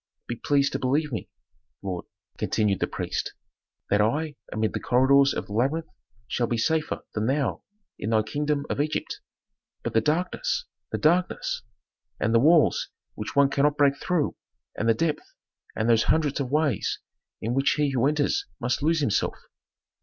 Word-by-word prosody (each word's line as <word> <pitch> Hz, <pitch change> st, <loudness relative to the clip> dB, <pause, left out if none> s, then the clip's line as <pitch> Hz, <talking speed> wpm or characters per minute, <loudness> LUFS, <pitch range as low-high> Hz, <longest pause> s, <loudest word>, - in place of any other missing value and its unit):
Be 120 Hz, -, -3 dB
pleased 140 Hz, +3 st, +2 dB
to -, -, -2 dB
believe 145 Hz, +4 st, +1 dB
me, 110 Hz, -7 st, -4 dB, 0.5 s
lord," 90 Hz, -3 st, -4 dB, 0.3 s
continued 105 Hz, -3 st, +1 dB
the -, -, 0 dB
priest, -, -, -3 dB, 0.6 s
"that 105 Hz, +1 st, +4 dB
I 145 Hz, +8 st, 0 dB, 0.2 s
amid 110 Hz, 0 st, -1 dB
the -, -, -2 dB
corridors 135 Hz, +2 st, +4 dB
of -, -, -3 dB
the 100 Hz, -, -9 dB
labyrinth 140 Hz, +9 st, 0 dB, 0.4 s
shall 120 Hz, +2 st, 0 dB
be 120 Hz, -, -1 dB
safer 160 Hz, +6 st, 0 dB
than 110 Hz, +1 st, -1 dB
thou 140 Hz, +1 st, 0 dB, 0.4 s
in 105 Hz, -, -3 dB
thy 110 Hz, -1 st, +3 dB
kingdom 145 Hz, +5 st, -1 dB
of -, -, -1 dB
Egypt." 155 Hz, +1 st, -2 dB, 0.6 s
"But -, -, -3 dB
the 110 Hz, -, +4 dB
darkness 180 Hz, -, 0 dB, 0.3 s
the -, -, -1 dB
darkness! 175 Hz, +4 st, +1 dB, 0.6 s
And 115 Hz, -, +1 dB
the 115 Hz, -, +6 dB
walls 155 Hz, +4 st, +4 dB, 0.2 s
which 105 Hz, +4 st, -6 dB
one 140 Hz, -1 st, +5 dB
cannot 145 Hz, +1 st, +2 dB
break 140 Hz, -2 st, +4 dB
through, 170 Hz, -1 st, 0 dB, 0.4 s
and 110 Hz, -, 0 dB
the 115 Hz, -, +5 dB
depth, 160 Hz, +3 st, -2 dB, 0.4 s
and 110 Hz, -, 0 dB
those 115 Hz, -1 st, +4 dB
hundreds 150 Hz, -3 st, +1 dB
of 135 Hz, -3 st, -2 dB
ways 145 Hz, -6 st, +1 dB, 0.4 s
in 115 Hz, +2 st, -2 dB
which 135 Hz, +2 st, +3 dB
he 150 Hz, -2 st, +1 dB
who 130 Hz, 0 st, +2 dB
enters 150 Hz, -, +1 dB
must 125 Hz, +1 st, -1 dB
lose 160 Hz, +1 st, +2 dB
himself. 115 Hz, -8 st, 0 dB
140 Hz, 170 wpm, -26 LUFS, 115-150 Hz, 0.6 s, the